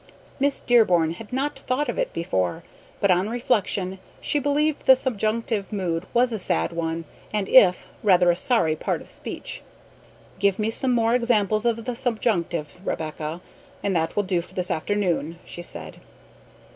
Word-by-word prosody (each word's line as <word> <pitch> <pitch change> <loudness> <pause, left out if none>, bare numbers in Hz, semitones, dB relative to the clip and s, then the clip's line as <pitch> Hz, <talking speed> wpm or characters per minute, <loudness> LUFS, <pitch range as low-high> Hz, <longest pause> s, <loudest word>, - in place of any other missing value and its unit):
Miss 280 +1 +2
Dearborn 180 -9 +4
had 220 - -11
not 270 +3 -2
thought 270 +4 -1
of 240 - -3
it - - 0
before, 95 - -1 0.4
but 200 - +3
on 185 +3 +2
reflection 200 -5 0 0.2
she 295 - +1
believed 290 +2 0
the 265 - +9
subjunctive 225 -4 -1
mood 185 -3 -2
was 245 +1 +3
a 220 - -2
"sad" 80 - 0
one 165 0 -3 0.3
and 210 -2 -1
"if" 185 -9 +6 0.2
rather 180 -4 +5
a - - 0
sorry 175 -6 +2
"part - - -2
of - - -12
speech." - - -5 0.8
"Give 200 -1 +2
me 215 +1 0
some 255 +3 +1
more 230 -1 +2
examples 220 -2 +2
of 230 -1 -1
the 250 -1 -3
subjunctive, 190 - -1
Rebecca, 155 -1 -4 0.4
and 195 -2 0
that 165 -1 0
will 205 - +2
do 185 -3 0
for - - -14
this 180 -1 -1
afternoon," 170 -3 -1
she 175 - -7
said. 80 - -6
200 Hz, 165 wpm, -24 LUFS, 170-235 Hz, 0.8 s, the